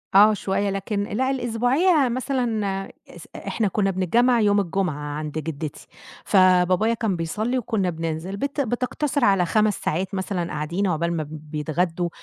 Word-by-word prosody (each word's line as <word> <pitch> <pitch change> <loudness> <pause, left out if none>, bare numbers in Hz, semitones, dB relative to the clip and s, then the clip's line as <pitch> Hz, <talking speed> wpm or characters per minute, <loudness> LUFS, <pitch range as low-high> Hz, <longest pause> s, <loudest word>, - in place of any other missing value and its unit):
آه 210 +2 +8
شوية، 200 0 -1
لكن 200 +1 -2
لأ 250 +6 -1
الأسبوعية 265 +6 +2
مثلًا 230 -7 -1 0.2
إس - - -12
إ - - -9
إحنا 220 - 0
كنا 195 0 +1
بنتجمّع 235 +7 +2
يوم 205 -1 +3
الجمعة 190 -3 -1 0.2
عند 150 -1 -4
جدتي. 155 -1 -6 0.4
فبابايا 185 +3 +4
كان 220 -5 -1
بيصلي 215 +10 -2
وكنا 220 -6 -1
بننزِل، 165 +3 -4
بت 280 +4 -2
بتقتصر 255 +3 -1
على 195 -3 +4
5 215 +4 +2
ساعات 185 +5 -1
مثلًا 185 -2 -2
قاعدين 170 +6 -1
عُقبال 170 0 0
ما 155 - -2
بيتغدوا 155 +3 -2
195 Hz, 145 wpm, -23 LUFS, 170-230 Hz, 0.4 s, آه